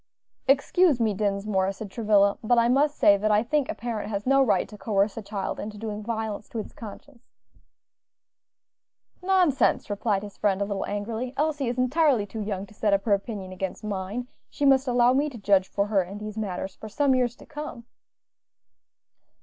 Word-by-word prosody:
"Excuse 285 Hz, +2 st, +3 dB
me, 220 Hz, -3 st, +2 dB
Dinsmore," 200 Hz, -1 st, 0 dB
said 195 Hz, 0 st, -8 dB
Travilla; 205 Hz, -3 st, +3 dB
"but 240 Hz, +2 st, +3 dB
I 235 Hz, 0 st, +4 dB
must 285 Hz, +4 st, +2 dB
say 200 Hz, -1 st, +6 dB
that 215 Hz, +2 st, 0 dB
I 210 Hz, +1 st, +3 dB
think 280 Hz, +3 st, 0 dB
a -, -, -2 dB
parent 225 Hz, -3 st, -4 dB
has 205 Hz, -1 st, -3 dB
no 275 Hz, +1 st, +4 dB
right 210 Hz, -8 st, +2 dB
to 210 Hz, -, -12 dB
coerce 205 Hz, -1 st, 0 dB
a 225 Hz, -, -5 dB
child 200 Hz, -1 st, -4 dB
into 210 Hz, 0 st, -6 dB
doing 210 Hz, -1 st, -5 dB
violence 220 Hz, -2 st, -4 dB
to -, -, -7 dB
its 215 Hz, -, -5 dB
conscience." 235 Hz, +3 st, -12 dB, 1.9 s
"Nonsense!" 360 Hz, -, +2 dB
replied 205 Hz, -1 st, 0 dB
his 205 Hz, -1 st, -10 dB
friend, 195 Hz, -2 st, +1 dB
a 200 Hz, -, 0 dB
little 200 Hz, -1 st, -3 dB
angrily. 225 Hz, +5 st, -4 dB
"Elsie 295 Hz, -3 st, 0 dB
is 240 Hz, +1 st, -2 dB
entirely 255 Hz, -3 st, +2 dB
too 215 Hz, +2 st, -6 dB
young 200 Hz, -2 st, -3 dB
to 205 Hz, -, -18 dB
set 210 Hz, -1 st, 0 dB
up 200 Hz, 0 st, +2 dB
her 210 Hz, -, +2 dB
opinion 200 Hz, -2 st, -3 dB
against 185 Hz, +2 st, -5 dB
mine; 210 Hz, +4 st, -4 dB, 0.2 s
she 290 Hz, -, -2 dB
must 270 Hz, 0 st, +4 dB
allow 245 Hz, 0 st, +4 dB
me 285 Hz, +3 st, +1 dB
to 255 Hz, -, -10 dB
judge 195 Hz, -3 st, +3 dB
for 200 Hz, -, -1 dB
her 205 Hz, -2 st, +2 dB
in 185 Hz, +3 st, -7 dB
these 210 Hz, 0 st, -7 dB
matters 190 Hz, -3 st, -4 dB
for 220 Hz, -, -9 dB
some 280 Hz, +4 st, +2 dB
years 250 Hz, -2 st, +1 dB
to -, -, -15 dB
come." 295 Hz, -6 st, -8 dB
215 Hz, 190 wpm, -26 LUFS, 200-250 Hz, 1.9 s, say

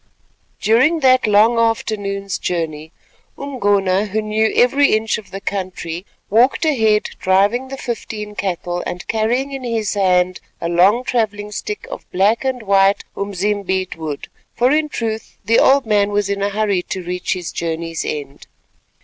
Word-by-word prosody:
During 260 Hz, +10 st, +3 dB
that 255 Hz, -3 st, +4 dB
long 215 Hz, +3 st, +4 dB
afternoon's 205 Hz, -4 st, -1 dB
journey 160 Hz, -3 st, -3 dB, 0.5 s
Umgona, 205 Hz, -7 st, +1 dB
who 210 Hz, +2 st, -1 dB
knew 215 Hz, +1 st, +1 dB
every 275 Hz, +4 st, +4 dB
inch 220 Hz, 0 st, 0 dB
of 215 Hz, -, -14 dB
the 195 Hz, -, -6 dB
country, 185 Hz, -3 st, -5 dB, 0.2 s
walked 245 Hz, -, +3 dB
ahead 220 Hz, -8 st, +3 dB, 0.2 s
driving 200 Hz, +7 st, +2 dB
the 270 Hz, +1 st, -7 dB
fifteen 220 Hz, -4 st, -5 dB
cattle 175 Hz, -3 st, -3 dB
and 180 Hz, +2 st, -6 dB
carrying 240 Hz, +5 st, 0 dB
in 270 Hz, -1 st, -6 dB
his 225 Hz, -4 st, -1 dB
hand 185 Hz, -2 st, +2 dB, 0.2 s
a 170 Hz, -, -2 dB
long 190 Hz, +8 st, +4 dB
travelling 215 Hz, -4 st, -1 dB
stick 420 Hz, -, -5 dB
of -, -, -8 dB
black 205 Hz, +6 st, +2 dB
and 260 Hz, -3 st, -2 dB
white 195 Hz, -1 st, +3 dB
umzimbeet 195 Hz, -1 st, -2 dB
wood, 155 Hz, -3 st, -5 dB, 0.3 s
for 245 Hz, +2 st, +3 dB
in 305 Hz, 0 st, +2 dB
truth 220 Hz, -4 st, -4 dB
the 230 Hz, +2 st, +4 dB
old 275 Hz, -1 st, +4 dB
man 205 Hz, -2 st, +2 dB
was 205 Hz, -1 st, 0 dB
in 200 Hz, 0 st, -2 dB
a 200 Hz, -, +1 dB
hurry 205 Hz, -2 st, 0 dB
to 185 Hz, +1 st, -5 dB
reach 180 Hz, +1 st, -2 dB
his 180 Hz, -3 st, -5 dB
journey's 165 Hz, 0 st, -3 dB
end. 145 Hz, -2 st, -6 dB
205 Hz, 155 wpm, -19 LUFS, 185-230 Hz, 0.5 s, that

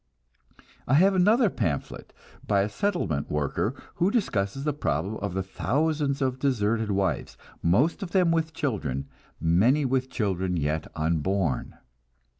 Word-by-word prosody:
I 130 Hz, -, +3 dB
have 190 Hz, +6 st, +5 dB
another 210 Hz, +6 st, +4 dB
pamphlet 85 Hz, -, -3 dB, 0.4 s
by 100 Hz, -1 st, +3 dB
a 100 Hz, -, 0 dB
settlement 100 Hz, -, -1 dB
worker, 75 Hz, -, -1 dB, 0.2 s
who 180 Hz, -, +3 dB
discusses 135 Hz, -, -1 dB
the 150 Hz, 0 st, 0 dB
problem 100 Hz, -, -2 dB
of 100 Hz, -3 st, -4 dB
the 95 Hz, -, 0 dB
thousands 145 Hz, +7 st, 0 dB
of 130 Hz, -1 st, -1 dB
deserted 115 Hz, -5 st, +1 dB
wives, 100 Hz, -1 st, -1 dB, 0.2 s
most 120 Hz, -, +2 dB
of 195 Hz, -, -4 dB
them 180 Hz, -2 st, +3 dB
with 160 Hz, -1 st, 0 dB
children, 105 Hz, -, -2 dB, 0.3 s
many 110 Hz, -, +3 dB
with 130 Hz, 0 st, 0 dB
children 95 Hz, -6 st, -1 dB
yet 75 Hz, +1 st, -1 dB
unborn. 80 Hz, +1 st, -1 dB
110 Hz, 135 wpm, -26 LUFS, 90-150 Hz, 0.4 s, have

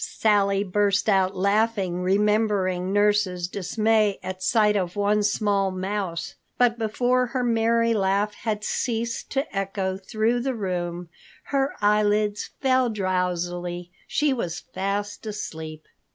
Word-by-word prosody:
Sally 200 Hz, -2 st, +2 dB
burst 200 Hz, +1 st, +1 dB
out 195 Hz, -2 st, +3 dB
laughing, 200 Hz, -2 st, +1 dB
remembering 195 Hz, -1 st, +1 dB
nurse's 205 Hz, -3 st, +2 dB
dismay 210 Hz, +2 st, +1 dB
at 185 Hz, 0 st, -6 dB
sight 210 Hz, 0 st, +3 dB
of 180 Hz, -2 st, -1 dB
one 205 Hz, +1 st, +2 dB
small 205 Hz, -2 st, +1 dB
mouse. 185 Hz, -2 st, -3 dB, 0.2 s
But 240 Hz, -1 st, +3 dB
before 245 Hz, +3 st, +1 dB
her 250 Hz, +1 st, -2 dB
merry 230 Hz, 0 st, +2 dB
laugh 200 Hz, 0 st, +1 dB
had 210 Hz, -2 st, -3 dB
ceased 230 Hz, 0 st, -2 dB
to 270 Hz, -5 st, -2 dB
echo 195 Hz, -1 st, -2 dB
through 220 Hz, +4 st, 0 dB
the 260 Hz, +1 st, -2 dB
room, 175 Hz, -4 st, -3 dB, 0.4 s
her 275 Hz, +1 st, +1 dB
eyelids 210 Hz, 0 st, +2 dB
fell 260 Hz, -2 st, +3 dB
drowsily. 180 Hz, -3 st, -2 dB, 0.2 s
She 295 Hz, -2 st, +1 dB
was 175 Hz, -9 st, -3 dB
fast 205 Hz, +3 st, -3 dB
asleep. 160 Hz, -7 st, -6 dB
205 Hz, 125 wpm, -24 LUFS, 185-220 Hz, 0.4 s, out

